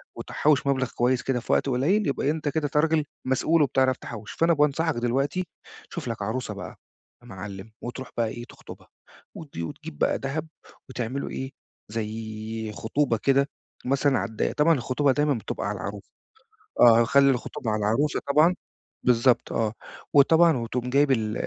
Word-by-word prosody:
وتحوش 145 -2 +1
مبلغ 130 -2 +1
كويس 125 +1 +2
كده 130 -2 -1
في - - -5
وقت 140 - +2
قليل، 160 +12 +2
يبقى 140 - -1
إيه، 145 - +3
أنت 155 -1 -2
كده 150 0 -1
ت 150 +1 -3
راجل 155 0 +3 0.2
مسؤول 140 +5 +2
وبتعرف 130 -2 +2
تحوش. 110 -4 -8
فأنا 165 +1 +2
بانصحك 150 +2 +1
دلوقتي 135 +9 -1 0.4
تشوف - - -6
لك 115 -3 -4
عروسة 110 +1 -3
بقى 95 -2 -8 0.5
يا 120 - -17
معلم 100 0 -8
وتروح 130 +2 -6
بقى 115 -1 +2
إيه، 120 +2 -6
تخطبها، - - -13 0.5
وت 155 -3 -10
وتجيب 85 -3 -6
بقى - - +2
دهب 145 +4 -3 0.4
وتعملوا 130 +2 -3
إيه، 130 0 -5 0.4
زي 110 0 -5
خطوبة 115 +3 0
كده 140 +4 +2 0.4
مثلًا 135 0 +2
على - - -3
الضيّق، 110 - -1
طبعًا 155 +3 +4
الخطوبة 135 +1 +1
دايمًا 145 +2 +2
بتبقى 115 -4 -4
على 100 0 -3
العروسة، 100 +1 -7 0.7
آه 115 -1 +7
خلي 140 +3 +5
الخطوبة 120 -2 -3
على 110 - 0
العروسة 115 +8 +1
طبعًا، 155 +5 +5 0.5
بالضبط 125 0 +3
آه، 110 -2 0 0.4
وطبعًا 160 +2 +6
وتقوم 120 +1 -3
جايب 140 +2 +3
ال 110 -4 +1
130 Hz, 165 wpm, -25 LUFS, 115-145 Hz, 0.7 s, آه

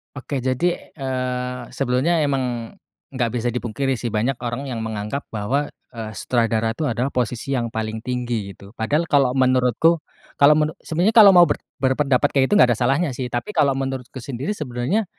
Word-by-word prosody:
Oke, 135 +1 -4
jadi, 130 +7 0 0.3
eee, 125 -2 -3
sebelumnya 140 +6 +1
emang, 125 -5 -2 0.4
gak 125 -4 -1
bisa 120 0 -1
dipungkiri 125 +3 -2
sih, 120 - -3
banyak 115 +5 0
orang 120 +4 -3
yang 120 -3 -4
menganggap 110 +5 -4
bahwa, 130 +7 -1 0.2
eee, 115 -3 -6
sutradara 115 -1 0
tuh, 155 - -2
adalah 125 +5 -1
posisi 125 +1 -2
yang 120 -2 -1
paling 110 0 -4
tinggi, 120 -4 -3
gitu. 100 0 -14
Padahal 145 +9 +1
kalau 135 -3 +4
menurutku, 130 +5 +3 0.4
kalau 145 +2 +7
menu 155 0 +1
sebenarnya 175 +7 +1
kalau 205 -3 +10
mau 175 -1 +7
ber - - +1 0.2
berpendapat 135 +1 +2
kayak 135 -2 +3
gitu, 205 - +4
gak 125 -10 +6
ada - - -6
salahnya 135 +4 +1
sih. 125 0 -4
Tapi, 120 +12 -4
kalau 140 -6 +2
menurutku 135 -1 -4
sendiri, 130 - -5
sebenarnya, 150 - -1
130 Hz, 175 wpm, -22 LUFS, 120-140 Hz, 0.4 s, kalau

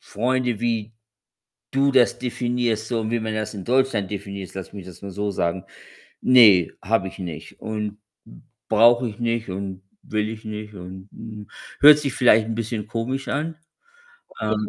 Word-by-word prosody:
Freunde, 125 +1 -1
wie 115 -2 -1 0.8
du 140 +1 +3
das 120 -2 +4
definierst, 120 -3 -1
so 115 -2 -1
wie 120 - +1
man 110 0 -3
das 110 0 -3
in 95 -3 -7
Deutschland 125 -6 +1
definierst, 100 -2 -6
lass 95 0 -7
mich 95 -3 -8
das 90 - -12
mal 100 - -7
so 100 +2 -2
sagen, 85 0 -2 0.6
ne, 110 -9 +7
habe 95 -1 +1
ich - - -14
nicht 85 -4 -7
und 105 -1 -4 0.7
brauche 120 +2 +5
ich 105 +2 -11
nicht 115 -2 -1
und 95 0 -5 0.2
will 110 0 -1
ich 110 0 -8
nicht 105 0 -6
und, 95 +2 -10
hm, 105 -2 -10 0.3
hört 150 +1 +10
sich 140 -3 -2
vielleicht 115 -4 +4
'n 115 - -3
bisschen 115 -2 -3
komisch 120 +4 -3
an, 155 +4 -2 0.9
ähm 105 -1 -1
110 Hz, 165 wpm, -23 LUFS, 100-120 Hz, 0.9 s, hört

